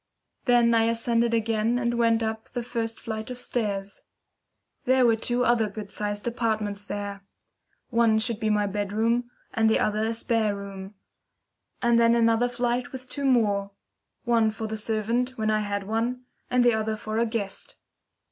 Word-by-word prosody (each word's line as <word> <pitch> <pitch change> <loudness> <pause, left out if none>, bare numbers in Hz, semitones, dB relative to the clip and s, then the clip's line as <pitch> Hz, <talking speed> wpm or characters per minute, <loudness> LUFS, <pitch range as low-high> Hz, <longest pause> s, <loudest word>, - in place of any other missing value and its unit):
Then 240 -2 +4
I 225 -1 +4
ascended 230 0 +1
again 225 +1 +1
and 240 -1 0
went 230 -1 +2
up 220 0 -4
the 245 -1 -4
first 230 -1 -3
flight 220 0 -5
of 250 - -5
stairs. 205 -5 -3 0.8
There 260 0 +4
were 230 -1 +5
two 240 +2 0
other 230 -2 +3
good 205 0 -8
sized 205 0 -3
apartments 215 -4 -1
there. 200 -1 -5 0.7
One 230 -2 +4
should 225 0 -1
be 220 -2 0
my 210 -1 +2
bedroom, 215 +4 0 0.2
and 225 -1 +3
the 220 - +4
other 215 +1 0
a 225 +1 -1
spare 225 -2 0
room. 200 0 -8 0.9
And 235 -1 +4
then 230 0 +5
another 230 +1 +3
flight 245 0 -1
with 255 -1 -9
two 280 -1 -3
more. 205 -6 +2 0.5
One 230 -2 +3
for 220 +1 -5
the 220 0 -3
servant, 230 +4 -1
when 215 -1 +1
I 215 - +2
had 205 -1 -2
one, 230 +5 -2 0.3
and 250 -1 +3
the 240 - +5
other 220 0 -1
for 215 +1 -3
a 235 - +2
guest. 205 -4 -4
225 Hz, 170 wpm, -26 LUFS, 215-235 Hz, 0.9 s, were